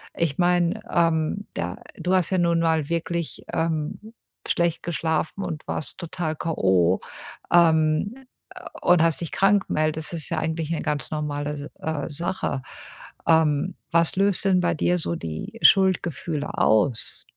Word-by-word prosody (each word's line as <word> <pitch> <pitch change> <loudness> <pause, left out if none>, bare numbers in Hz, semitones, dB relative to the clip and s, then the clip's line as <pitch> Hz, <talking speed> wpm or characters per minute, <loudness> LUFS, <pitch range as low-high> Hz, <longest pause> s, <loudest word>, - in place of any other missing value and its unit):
ich 160 -5 -1
meine, 175 +3 +2
ähm, 165 +3 +1
da 90 +2 -3 0.2
du 180 - -1
hast 185 -3 +2
ja 190 - +2
nun 170 -1 +2
mal 160 -3 +1
wirklich, 170 0 -2
ähm, 165 +7 -2 0.3
schlecht 170 -1 0
geschlafen 165 +2 -1
und 165 -4 -5
warst 155 - -4
total 170 -2 -3
K.O. 95 - +2 0.5
Ähm, 160 +3 +4 0.7
und 175 -2 +5
hast 165 -4 +2
dich 170 - -4
krank 195 0 +3
gemeldest. 155 +1 -1
Das 165 - -3
ist - - -2
ja - - -1
eigentlich 160 0 -2
eine 165 - -3
ganz 145 -1 -2
normale, 150 -1 -2
S 145 0 -7
äh, 160 -2 -3
Sache. 150 -3 -3 0.7
Ähm, 160 +2 +3 0.2
was 170 -1 +2
löst 200 0 +2
denn 185 -2 +4
bei 175 -1 +1
dir 180 +3 +1
so 85 - -2
die 85 - -6
Schuldgefühle 175 -2 +2
aus? 115 - +1
165 Hz, 150 wpm, -24 LUFS, 150-175 Hz, 0.7 s, und